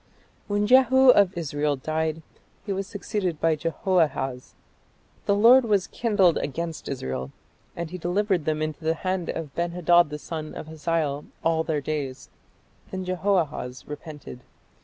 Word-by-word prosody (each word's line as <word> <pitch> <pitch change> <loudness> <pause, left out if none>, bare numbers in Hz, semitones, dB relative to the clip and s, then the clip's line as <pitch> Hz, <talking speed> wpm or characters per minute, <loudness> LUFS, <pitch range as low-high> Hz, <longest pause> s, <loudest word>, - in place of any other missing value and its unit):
" - - -36
When 205 0 +1
Jehu 260 +2 +6
of 200 -6 +3
Israel 145 -2 -1
died, 155 +3 -2 0.4
he 200 - -2
was 195 0 -3
succeeded 195 -5 -3
by 165 -1 +2
Jehoahaz. 150 -5 -1 0.7
"The 200 - +4
Lord 240 +5 +7
was 205 -5 +2
kindled 205 -7 +2
against 165 +3 -4
Israel, 65 - -4 0.5
and 170 -1 -5
he 185 - -6
delivered 180 -1 0
them 155 0 0
into 155 +1 -5
the 160 +1 +1
hand 185 0 -2
of 155 -4 -5
Ben 170 0 -2
hadad 175 -2 +4
the 150 - -5
son 155 0 -6
of - - -6
Hazael 155 -2 -2 0.2
all 165 -1 +2
their 155 -3 -1
days." 140 -3 -4 0.6
Then 185 -1 -5
Jehoahaz 175 -9 -1
repented. 150 -3 -9
165 Hz, 150 wpm, -25 LUFS, 150-190 Hz, 0.7 s, Lord